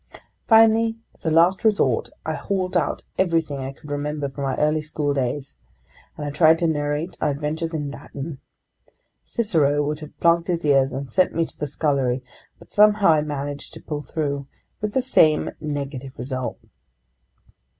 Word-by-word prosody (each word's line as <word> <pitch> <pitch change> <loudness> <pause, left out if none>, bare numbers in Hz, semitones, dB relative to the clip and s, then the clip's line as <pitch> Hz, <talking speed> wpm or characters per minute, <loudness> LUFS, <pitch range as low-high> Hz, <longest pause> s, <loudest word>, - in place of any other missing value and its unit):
Finally, 225 0 +5 0.2
as - - -8
a - - +4
last 170 +5 +4
resort, 215 -2 +2 0.2
I - - -1
hauled 190 -2 -2
out - - 0 0.2
everything 165 -6 +1
I 135 0 -4
could 145 +2 -12
remember 145 0 -2
from 140 +1 -5
my 135 - 0
early 155 +1 +2
schooldays, 145 -3 -2 0.6
and 150 - -4
I 145 - -3
tried 160 +2 +5
to 170 0 +1
narrate 150 +2 -1
our - - +2
adventures 155 +3 -2
in 145 -2 -3
Latin. 140 0 -7 0.9
Cicero 150 -10 +1
would 150 +1 -2
have 155 -1 -11
plugged 170 0 +3
his 170 -3 -1
ears 135 -2 +4
and 135 0 -5
sent 185 - +2
me 165 0 +2
to - - -14
the 150 - -3
scullery, 135 -4 0 0.3
but - - -18
somehow 210 -2 +5
I 155 -2 +5
managed 145 -1 -5
to - - -8
pull 150 -1 -4
through. 140 -1 -3 0.3
With 210 -1 -2
the 260 - +1
same 155 -12 +4
negative 140 -3 -5
result. 130 -1 -4
150 Hz, 165 wpm, -23 LUFS, 140-170 Hz, 0.9 s, Finally